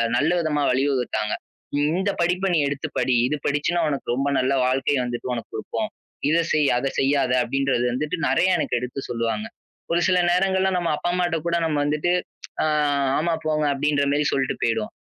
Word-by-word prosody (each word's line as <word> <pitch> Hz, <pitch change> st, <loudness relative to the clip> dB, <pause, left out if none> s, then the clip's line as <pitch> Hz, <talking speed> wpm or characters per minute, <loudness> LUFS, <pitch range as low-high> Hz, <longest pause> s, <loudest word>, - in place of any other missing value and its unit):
நல்ல 150 Hz, +7 st, +2 dB
விதமா 155 Hz, -3 st, 0 dB
வழிவகுத்தாங்க. 125 Hz, -5 st, 0 dB, 0.5 s
"இந்த 180 Hz, +7 st, +1 dB
படிப்பை 180 Hz, +3 st, +1 dB
நீ 165 Hz, -, +3 dB
எடுத்துப் 140 Hz, 0 st, -4 dB
படி. 130 Hz, -, +2 dB
இது 150 Hz, -, -1 dB
படிச்சீன்னா 150 Hz, +4 st, +1 dB
உனக்கு 140 Hz, -4 st, -2 dB
ரொம்ப 135 Hz, +2 st, -1 dB
நல்ல 130 Hz, +2 st, +1 dB
வாழ்க்கை 130 Hz, +3 st, +1 dB
வந்துட்டு 125 Hz, 0 st, -4 dB
உனக்கு 115 Hz, -2 st, -5 dB
கொடுப்போம். -, -, -3 dB, 0.4 s
இதைச் 165 Hz, +1 st, +1 dB
செய், 150 Hz, -2 st, +3 dB
அதைச் 135 Hz, +2 st, -2 dB
செய்யாதே," 135 Hz, -2 st, +2 dB
அப்படின்றது 135 Hz, -1 st, 0 dB
வந்துட்டு 150 Hz, +7 st, -2 dB
நெறைய 175 Hz, +8 st, +3 dB
எனக்கு 125 Hz, -, 0 dB
எடுத்துச் 125 Hz, +2 st, -6 dB
சொல்லுவாங்க. 115 Hz, -, -2 dB, 0.5 s
ஒரு 170 Hz, -, +2 dB
சில 180 Hz, -1 st, +3 dB
நேரங்கள்ல 190 Hz, +1 st, +2 dB
நம்ம 175 Hz, -2 st, 0 dB
அப்பா, 175 Hz, -, -1 dB
அம்மாட்ட 175 Hz, -2 st, 0 dB
கூட 170 Hz, 0 st, +1 dB
நம்ம 155 Hz, -2 st, 0 dB
வந்துட்டு, 150 Hz, +4 st, +1 dB, 0.5 s
ஆ, -, -, +2 dB, 0.5 s
"ஆமா, 165 Hz, +1 st, +1 dB
போங்க," 155 Hz, -1 st, +1 dB
அப்படின்ற 145 Hz, 0 st, +1 dB
மாரி 145 Hz, 0 st, +1 dB
சொல்லிட்டு 135 Hz, -2 st, -1 dB
போயிடுவோம். 110 Hz, -2 st, -1 dB
145 Hz, 170 wpm, -23 LUFS, 130-170 Hz, 0.5 s, நீ